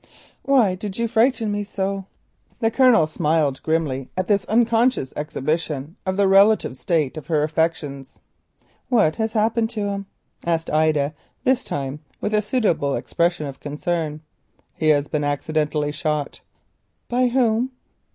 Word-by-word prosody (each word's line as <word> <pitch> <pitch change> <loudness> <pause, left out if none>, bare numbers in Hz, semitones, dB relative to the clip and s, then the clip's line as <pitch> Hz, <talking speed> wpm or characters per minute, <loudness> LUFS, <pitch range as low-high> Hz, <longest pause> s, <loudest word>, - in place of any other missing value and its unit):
"Why 255 -9 +3
did 190 +1 -6
you 235 0 0
frighten 225 -1 +2
me 205 0 -1
so?" 195 -1 -3 0.5
The 225 -1 +1
Colonel 245 -9 +5
smiled 155 -3 0
grimly 150 -5 -1
at 185 - -1
this 200 -3 +2
unconscious 230 - +2
exhibition 150 +1 -3
of 185 0 0
the 200 -1 +4
relative 195 -6 +4
state 155 0 -1
of 155 - -8
her 155 -3 +2
affections. 150 -3 -2 0.7
"What 210 -11 +3
has 220 -1 -1
happened 225 +1 +1
to - - 0
him?" 200 -1 -4 0.4
asked 165 -1 -1
Ida, 155 -1 +2 0.3
this 260 -1 +2
time 140 0 -4 0.2
with 210 - -2
a 210 - +3
suitable 200 - 0
expression 170 -2 0
of 135 -1 -7
concern. 150 +1 -3 0.5
"He 155 - -2
has 145 -1 +3
been 150 0 -1
accidentally 150 +1 -1
shot." 150 -1 -3 0.7
"Who 250 +1 +3
by?" 240 -1 +2
170 Hz, 140 wpm, -22 LUFS, 150-220 Hz, 0.7 s, Colonel